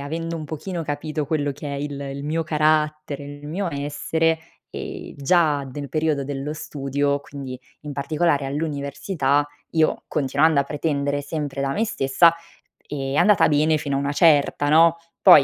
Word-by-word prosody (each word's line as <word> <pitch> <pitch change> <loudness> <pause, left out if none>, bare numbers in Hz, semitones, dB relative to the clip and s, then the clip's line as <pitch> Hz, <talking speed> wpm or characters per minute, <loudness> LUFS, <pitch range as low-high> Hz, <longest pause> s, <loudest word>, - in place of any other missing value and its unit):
avendo 165 +4 -4
un 155 - -5
pochino 165 +3 -5
capito 150 +1 -3
quello 145 -1 0
che 145 - -8
è - - -3
il 145 0 -4
il 140 0 -5
mio 160 +2 0
carattere, 155 -2 +1
il 145 +1 -9
mio 185 +4 -2
essere, 160 +3 0 0.3
ehm, - - -7
già 145 -1 +2
del 140 +1 -6
periodo 155 -2 0
dello 140 +1 -4
studio, 140 -2 -1
quindi 135 -3 -8 0.2
in 150 -1 -7
particolare 145 +1 +1
all'università 145 0 -1 0.2
io 160 -1 +1
continuando 145 +2 +2
a - - -1
pretendere 145 -1 -1
sempre 145 -2 -3
da 135 0 0
me 225 +9 0
stessa, 165 0 +4 0.5
è 135 -2 -3
andata 190 +4 +5
bene 155 +1 +3
fino 145 -2 -2
a - - +1
una 140 +1 -1
certa, 145 -2 +4
no. 165 +2 +6 0.3
Poi, 145 - +9
145 Hz, 160 wpm, -23 LUFS, 140-160 Hz, 0.5 s, Poi